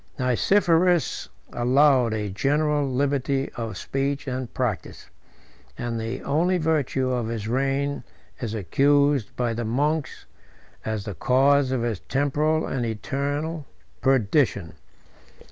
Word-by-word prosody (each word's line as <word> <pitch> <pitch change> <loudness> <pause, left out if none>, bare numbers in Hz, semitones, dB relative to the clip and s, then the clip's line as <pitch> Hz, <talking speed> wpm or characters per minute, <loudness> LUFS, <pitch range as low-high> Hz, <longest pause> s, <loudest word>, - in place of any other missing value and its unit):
Nicephorus 170 - +2 0.2
allowed 130 0 +4
a 105 -2 -2
general 145 +6 +1
liberty 135 0 0
of 115 -5 -5
speech 135 +6 -2
and 130 -2 -4
practice; 120 -7 -4 0.7
and 120 -1 -3
the 115 +3 -4
only 170 +6 +1
virtue 145 -5 0
of 120 -3 -1
his 110 -2 -4
reign 135 +3 -1 0.4
is 115 -4 -4
accused 140 - +2
by 120 -2 -1
the 120 +1 -3
monks 145 +5 -1 0.6
as 110 -2 -3
the 105 - -4
cause 135 +5 +3
of 125 -3 0
his 115 -5 -2
temporal 150 +3 0
and 130 -2 -2
eternal 140 +7 -3 0.3
perdition. 120 - +2
135 Hz, 115 wpm, -24 LUFS, 115-145 Hz, 0.7 s, allowed